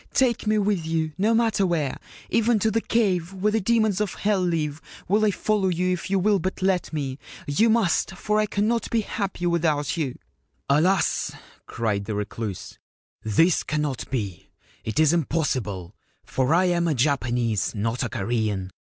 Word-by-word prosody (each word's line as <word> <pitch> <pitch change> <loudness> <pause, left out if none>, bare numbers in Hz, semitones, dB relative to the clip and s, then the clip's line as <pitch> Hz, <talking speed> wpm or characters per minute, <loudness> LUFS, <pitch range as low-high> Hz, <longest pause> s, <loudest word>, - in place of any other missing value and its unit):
Take 240 -4 +2
me 215 0 +3
with 200 -4 +1
you, 160 -1 -1
no 215 +5 +2
matter 225 -3 +2
where; 165 -7 0 0.3
even 230 0 +3
to 220 +2 +1
the 225 - +1
Cave 190 -7 0
where 195 +3 0
the 220 +1 +1
Demons 215 -1 +2
of 210 - -2
Hell 205 -2 +1
live 160 -4 -1 0.3
will 210 +4 +2
I 215 - +4
follow 205 0 0
you 180 +1 +1
if 180 - -5
you 195 - +2
will 200 +1 +3
but 185 +2 -3
let 190 -2 +1
me! 140 -3 -3 0.3
You 215 +11 +2
must, 200 -4 +2
for 210 +3 0
I 215 - +2
cannot 215 +4 0
be 230 - +1
happy 195 -4 -3
without 165 -3 +1
you/ 140 -6 -2 0.3
' 70 -3 -45
Alas/ 165 +5 +2 0.3
cried 105 -4 -2
the 105 0 -3
Recluse, 105 -1 -5 0.2
' - - -44
this 165 +1 +5
cannot 150 -4 -3
be! 100 -9 -4 0.3
It 110 +7 -2
is 155 0 +5
im 170 -4 +2
possible; 105 - -2 0.3
for 130 +1 0
I 175 +3 +4
am 175 -1 +1
a 155 - +1
Japanese, 120 -6 0
not 115 +3 -1
a 125 - -1
Korean. 105 -3 -2
170 Hz, 180 wpm, -24 LUFS, 130-205 Hz, 0.3 s, this